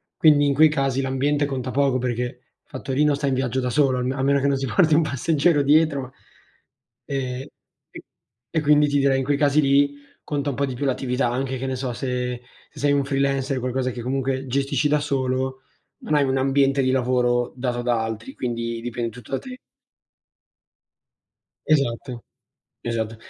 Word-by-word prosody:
Quindi 150 -2 +5
in 140 - +2
quei 155 +3 +6
casi 135 -3 0
l'ambiente 140 +2 0
conta 130 -2 -4
poco 135 -1 +2
perché 125 -1 -1
il 120 - -8 0.3
fattorino 145 +2 0
sta 140 0 -2
in 135 - +1
viaggio 130 -1 -1
da 125 -1 -1
solo 130 0 +2
a - - -1
me 130 +1 -1
a 135 - -3
meno 140 +1 +3
che 140 - +1
non 140 - +2
si 135 - -2
porti 155 +7 +3
un 160 - +5
passeggero 155 +1 +1
dietro. 140 -2 +2 0.9
Ehm 130 -2 -3 0.5
e - - -10 0.5
e 160 - 0
quindi 150 0 +4
ti 145 - +1
direi 135 -1 +3
in - - -1
quei 145 +1 +1
casi 145 0 +3
lì 140 0 +3 0.3
conta 145 -1 -2
un 130 - -6
po' 140 - 0
di 130 -2 -5
più 140 - -3
l'attività; 125 -1 0
anche 130 +1 -2
che 135 +1 -4
ne 130 - -2
so 130 0 -3
se 125 +1 -3 0.3
se 150 - -14
sei 145 +1 +2
un 140 - +2
freelancer, 135 -1 0
qualcosa 130 +1 -2
che 120 - -7
comunque 135 +1 -2
gestisci 140 +3 0
da 150 0 +2
solo, 130 -2 -2 0.4
non 155 - -1
hai 145 - +4
un 135 0 0
ambiente 135 +1 +2
di 130 - +2
lavoro 125 -1 +1
dato 125 -1 -2
da 120 -2 0
altri, 115 +3 -6
quindi 115 -1 -3
dipende 120 0 -3
tutto 120 +1 -13
da 135 - 0
te. 255 -1 -9 2.1
Esatto, 125 -4 0 0.6
esatto 115 -1 -3
135 Hz, 190 wpm, -23 LUFS, 125-140 Hz, 2.1 s, quei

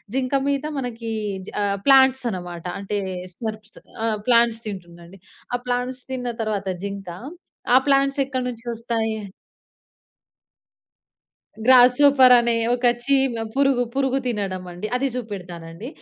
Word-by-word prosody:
జింక 260 0 -1
మీద 280 0 0 0.2
మనకి 230 -3 -5 0.4
జ - - -8
ఆహ్, 200 0 0
ప్లాంట్స్ 265 -1 +6
అనమాట. 175 -2 -7
అంటే 205 +1 -3 0.4
స్మర్ప్స్ 215 -1 -7 0.3
ఆ! - - +1 0.2
ప్లాంట్స్ 235 -1 +4
తింటుందండి. 175 -1 -9 0.4
ఆ - - +1
ప్లాంట్స్ 250 +1 -2
తిన్న 250 -2 -3
తర్వాత 205 -3 -2 0.2
జింక 200 -2 -6 0.7
ఆ - - +10
ప్లాంట్స్ 275 0 +3
ఎక్కడి 260 -2 -3
నుంచి 235 -1 -9
ఒస్తాయి? 225 -1 -2 2.5
గ్రాస్‌హోపర్ 255 +1 +7
అనే 235 0 +1 0.2
ఒక 245 0 +2 0.2
చీమ 270 -2 +2 0.2
పురుగు 275 -2 +3
పురుగు 270 -1 +1
తినడమండి. 185 -3 -4
అది 270 +2 +1
జూపెడతానండి. 180 -3 -7
235 Hz, 115 wpm, -22 LUFS, 200-260 Hz, 2.5 s, ఆ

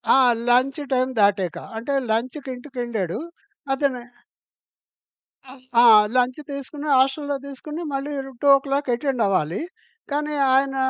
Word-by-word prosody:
ఆ! - - +6 0.3
Lunch 255 +4 +3
time 255 +1 +1
దాటాక. 200 -3 +2 0.2
అంటే 250 +5 -3 0.2
లంచ్‌కింటికెళ్ళాడు 245 - -3 0.5
అతనె 270 -3 -1 1.5
ఆహ్, 260 -1 -14 0.2
ఆ! - - +6 0.3
లంచ్ 250 +3 +1
తీసుకొని 285 +2 -7
హాస్టల్లో 275 +2 +1
తీసుకొని 300 +4 -7
మళ్ళీ 275 +2 -3 0.3
2:00 275 -1 +3
అటెండవ్వాలి. 205 - 0 0.5
కానీ 300 +1 -1 0.2
ఆయన 270 0 +2
265 Hz, 100 wpm, -22 LUFS, 245-280 Hz, 1.5 s, ఆ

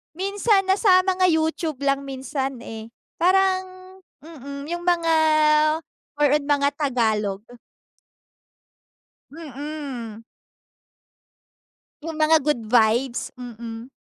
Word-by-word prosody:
Minsan, 395 +1 +1
nasa 380 -1 +5
mga 370 0 +1
YouTube 320 -3 0
lang 275 0 0
minsan, 270 -1 -4
eh. 220 -2 -8 0.3
Parang 375 +1 +3 0.6
mm, 280 -2 -9
yung 345 0 -4
mga 335 -2 +2 1.0
more 290 -2 +2
on 290 - -9
mga 285 -1 +2
Tagalog. 220 -8 0 1.9
Mm. 280 -7 -7 1.8
Yung 320 0 -6
mga 310 0 +4
good 275 -5 -1
vibes, 235 +2 +2
mm. 235 0 -9
290 Hz, 90 wpm, -23 LUFS, 245-335 Hz, 1.9 s, nasa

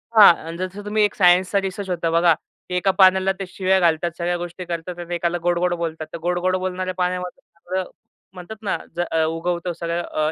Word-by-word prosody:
हां. 210 -5 +10
आणि 165 - -6
जसं 185 +3 -5
तुम्ही 210 +1 +1
एक 205 - +1
सायन्सचा 185 +1 +4
रिसर्च 195 0 -5
होता 170 -2 -1
बघा, 170 0 +5
की 180 +3 -10
एका 190 +2 +2
पाण्याला 190 0 +5
ते 195 - -3
शिव्या 190 +1 +1
घालतात, 170 0 +2
सगळ्या 175 0 -1
गोष्टी 175 +1 -6
करतात 175 +1 -5
आणि 175 0 -4
एकाला 175 0 0
गोड-गोड 175 0 +1
बोलतात. 160 -2 -4
तर - - -3
गोड-गोड 180 +2 0
बोलणाऱ्या 185 0 -2
पाण्यामध्ये 180 +6 -2 0.2
सगळं 185 +2 -3 0.5
म्हणतात 185 +4 -9
ना, 200 - 0 0.2
ज 175 - -7
अ, 160 -1 +2
उगवतो 170 +2 -2
सगळं 170 +1 -3
अ, 155 -1 -1
180 Hz, 200 wpm, -22 LUFS, 170-185 Hz, 0.5 s, हां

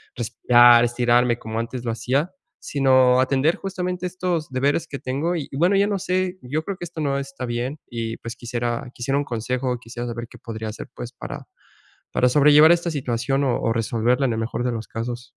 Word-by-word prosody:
respirar, 120 0 +5
estirarme 120 0 +2
como 110 +1 -4
antes 120 +1 -5
lo 115 - 0
hacía, 135 +8 -1 0.3
sino 130 -2 +4
atender 135 +5 +2
justamente 180 -1 -4
estos 175 -4 -2
deberes 140 +5 +1
que 140 - -6
tengo 145 +7 -2
y, 150 -4 -3
bueno, 180 +5 +3
ya 200 +1 +3
no 205 - 0
sé, 185 0 -1
yo 150 +6 -3
creo 200 - -4
que - - -8
esto 165 -1 -9
no 140 -1 0
está 135 -2 -6
bien 125 +5 -3
y 115 -1 -4
pues 115 +1 -7
quisiera 120 0 -3
quisiera 135 +3 -1
un 145 - +1
consejo, 125 +2 -2
quisiera 120 0 -7
saber 120 0 -5
qué - - -14
podría 110 -1 -6
hacer 105 - -8
pues, - - -7
para - - -8 0.7
para 125 - +3
sobrellevar 150 +3 +7
esta 170 0 +1
situación 135 0 -1
o 125 - 0
o 115 - +1
resolverla 115 +4 +1
en 120 - 0
el - - -3
mejor 115 +2 -3
de 125 - 0
los 115 -1 -5
casos. 120 +2 -4
125 Hz, 200 wpm, -23 LUFS, 120-150 Hz, 0.7 s, sobrellevar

